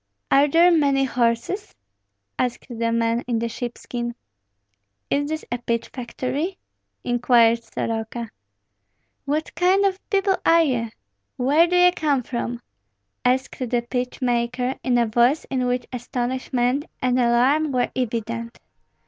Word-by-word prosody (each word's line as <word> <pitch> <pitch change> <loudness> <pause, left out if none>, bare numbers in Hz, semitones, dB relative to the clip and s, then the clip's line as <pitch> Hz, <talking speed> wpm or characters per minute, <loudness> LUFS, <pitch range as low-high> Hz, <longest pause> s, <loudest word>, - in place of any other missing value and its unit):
"Are 280 +2 +6
there 335 +4 +5
many 280 -4 +3
horses?" 240 - -1 0.6
asked 250 -1 -1
the 230 -2 -2
man 230 0 +1
in 240 -2 0
the 230 +1 -1
sheepskin. 240 0 -5 1.0
"Is 285 +1 +1
this 315 0 -4
a 240 - -1
pitch 230 -1 -2
factory?" 275 +8 -4 0.5
inquired 235 -1 +3
Soroka. 225 0 -4 0.9
"What 300 +3 -2
kind 375 +3 +3
of 385 -1 0
people 390 -1 +2
are 335 0 +5
ye? 240 -6 -1 0.5
Where 290 +7 +4
do 360 - 0
ye 360 0 +6
come 290 -7 0
from?" 240 0 -4 0.6
asked 255 +1 0
the 245 -2 -1
pitch 250 +1 -3
maker, 245 +1 0
in 250 -2 +2
a 240 - +3
voice 240 +6 +2
in 255 -2 0
which 250 0 -1
astonishment 250 +2 -1
and 255 0 +1
alarm 255 +6 +3
were 250 -2 0
evident. 230 -1 -3
250 Hz, 130 wpm, -23 LUFS, 235-285 Hz, 1.0 s, Are